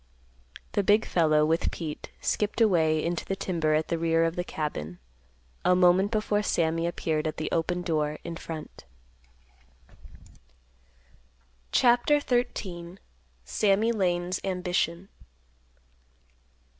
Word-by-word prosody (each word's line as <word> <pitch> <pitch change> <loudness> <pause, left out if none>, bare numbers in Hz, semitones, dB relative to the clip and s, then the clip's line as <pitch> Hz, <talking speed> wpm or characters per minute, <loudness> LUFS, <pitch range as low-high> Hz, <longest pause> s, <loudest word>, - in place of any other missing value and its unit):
The 205 - +1
big 205 +3 +3
fellow, 155 -3 +3
with 165 +2 +1
Pete, 155 -3 -6
skipped 210 +2 -1
away 160 -8 +3
into 170 0 -2
the 195 - -3
timber 165 -5 0
at 155 +1 -1
the 165 - -1
rear 165 0 +2
of 165 0 0
the 175 - -2
cabin, 90 - -5 0.7
a 180 - +4
moment 180 +2 +4
before 215 -1 0
Sammy 165 -3 0
appeared 160 -2 -1
at 155 - -4
the 155 - -3
open 175 +2 -1
door 155 -3 -1
in 170 -1 -5
front. 160 -1 -8 2.9
CHAPTER 245 +4 +4
XIII. 190 -10 -2 0.5
SAMMY 210 +2 +2
LANE'S 180 -3 0
AMBITION. 180 -1 -1
175 Hz, 115 wpm, -27 LUFS, 160-195 Hz, 2.9 s, a